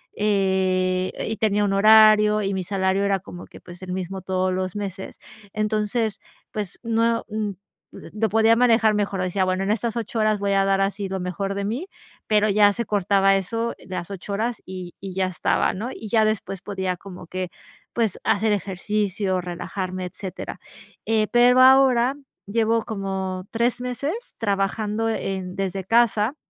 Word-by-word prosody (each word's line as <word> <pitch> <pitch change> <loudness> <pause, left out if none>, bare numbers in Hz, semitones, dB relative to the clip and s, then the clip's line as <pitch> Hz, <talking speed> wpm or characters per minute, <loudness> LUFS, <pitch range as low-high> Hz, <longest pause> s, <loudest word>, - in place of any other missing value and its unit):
eh 190 -2 +1 0.2
y 220 - -3
tenía 210 -1 +1
un 195 - 0
horario, 215 0 +6
y 195 0 -1
mi 190 -1 -2
salario 190 +1 0
era 200 -1 +2
como 175 -1 -10
que - - -14
pues, 175 +1 -12
el 185 -1 -5
mismo 190 +1 -4
todos 185 0 -1
los 185 0 -3
meses. 195 -2 -6 0.4
Entonces 215 0 -1 0.3
pues 205 -3 -4
no 230 0 +1
mm, 215 -1 -2 0.4
pues - - -12
lo 220 +1 +1
podía 225 +2 +4
manejar 230 -3 +4
mejor, 205 -2 -1
decía 185 +1 0
bueno, 185 +1 0
en 195 - 0
estas 230 +1 -1
8 230 0 -3
horas 215 -1 +2
voy 200 0 0
a 195 0 +3
dar 195 0 +2
así 195 0 -1
lo 190 0 -3
mejor 195 +2 -3
de 200 - -2
mí, 245 - -3 0.4
pero 215 0 +3
ya 205 0 +5
se 235 +3 -3
cortaba 195 -1 +3
eso, 230 +5 -2
las 185 -1 -5
8 195 +1 -6
horas, 225 +3 -2
y 185 -2 -8
y 190 -1 -7
ya 190 0 0
estaba, 185 - 0
¿no?, 215 +6 -4
y 220 - -8
ya 220 0 +4
después 200 -3 -2
podía 190 -2 -3
como 180 -3 -11
que 185 0 -4 0.4
pues 225 -5 0
hacer 215 +2 +2
ejercicio, 200 0 -1
relajarme, 180 +1 -5
etcétera. 185 0 -7 0.5
Eh, 220 -1 +2
pero 245 +1 +5
ahora 260 -1 +5 0.3
llevo 225 +2 +1
como 190 -2 -4
3 235 +1 0
meses 280 - -4
trabajando 210 +1 -1
en 190 -4 -3
desde 195 -1 -3
casa, 230 +2 +3
200 Hz, 170 wpm, -23 LUFS, 190-220 Hz, 0.5 s, horario